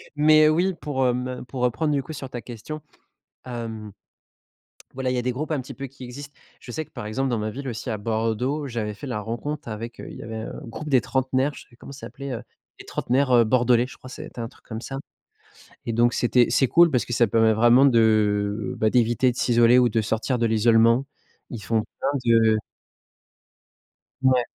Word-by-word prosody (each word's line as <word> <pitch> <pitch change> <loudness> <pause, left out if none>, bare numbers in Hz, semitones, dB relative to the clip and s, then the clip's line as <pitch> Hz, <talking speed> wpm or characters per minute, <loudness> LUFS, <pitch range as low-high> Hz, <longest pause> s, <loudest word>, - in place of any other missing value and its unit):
Mais 155 +1 +6
oui, 180 +4 +2
pour, 135 -2 -1
hem, 125 +1 -2
pour 125 +2 -6
reprendre, 125 +5 +1
du 140 -2 0
coup, 155 - -8
sur 135 -2 -7
ta 120 -2 -6
question, 130 +6 -8 0.6
hem 115 -4 -6 1.0
voilà 130 -1 -1
il - - -1
y - - 0
a - - -1
des 125 +1 -1
groupes, 150 +6 -4
un 145 -4 0
petit 130 - -9
peu, 135 -1 -6
qui 130 0 -13
existent. 140 +3 -9 0.3
Je 120 - -10
sais 155 - -3
que, - - -30
par 105 - -7
exemple, 130 +5 -1
dans 120 - 0
ma 110 0 -2
ville, 135 +2 -7
aussi 120 +1 -5
à 110 - -2
Bordeaux, 115 +7 -1
j'avais 110 -4 -3
fait 140 - -8
la 105 -4 -3
rencontre 120 +6 -5
avec, 115 +2 -6
heu, - - -8
il - - -9
y - - -8
avait 110 0 -6
un 110 - -6
groupe 150 +6 -7
des 130 -4 +4
trentenaires, 130 +2 0
je - - -11
sais - - -17
plus 120 - -22
comment 140 - -11
ça 140 - -9
s'appelait, 140 -1 -7
heu, 115 - -5 0.4
les - - -11
trentenaires, 130 +1 0
heu, 120 - +6
bordelais, 120 +1 +3
je - - -13
crois, 130 - -12
c'était 125 - -9
un 115 - -3
truc - - -21
comme 110 0 -6
ça, 135 +1 -6 0.9
et 115 - -1
donc 120 +1 +3
c'était 120 0 +3
c'est 135 - +3
cool 170 -1 +6
parce 125 - +1
que 120 - -6
ça 120 - +4
permet 110 +1 +4
vraiment 120 +5 +6
de, 105 -3 +2
bah, 110 -1 +2
d'éviter 120 +1 +3
de - - -15
s'isoler 120 0 +4
ou 125 -1 +5
de 110 0 +1
sortir 115 +4 -1
de 115 - +2
l'isolement. 115 +3 +4 0.4
Ils 115 -4 -7
font 110 +1 0 0.2
plein 135 - +1
de 115 -2 +4 1.7
Ouais. 130 -2 +4
120 Hz, 220 wpm, -24 LUFS, 115-135 Hz, 1.7 s, Mais